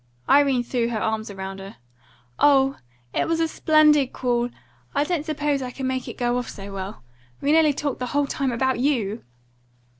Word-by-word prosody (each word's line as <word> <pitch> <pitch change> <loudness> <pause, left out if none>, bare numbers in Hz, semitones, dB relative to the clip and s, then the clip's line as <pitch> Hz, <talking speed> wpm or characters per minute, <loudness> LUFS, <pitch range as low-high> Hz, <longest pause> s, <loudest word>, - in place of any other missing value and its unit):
Irene 275 -3 +4
threw 240 -1 -1
her 225 -2 -2
arms 220 0 -2
round 195 0 -6
her. 195 +1 -9 0.6
"Oh, 270 -1 +4 0.4
it - - 0
was 330 0 0
a 325 - +2
SPLENDID 305 -4 +4
call! 240 -1 0 0.5
I 285 - +3
didn't 320 -1 -2
suppose 295 -2 0
I 255 - -4
could 265 +1 -6
make 260 -1 -2
it - - -7
go 245 0 +1
off 245 - -5
so 200 -1 -8
well. 190 - -6 0.4
We 285 - +1
talked - - +5 0.3
nearly 285 -3 -1
the 250 - -2
whole 285 +3 +1
time 275 -1 -1
about 260 +1 0
you!" 240 -6 0
260 Hz, 185 wpm, -24 LUFS, 230-285 Hz, 0.6 s, talked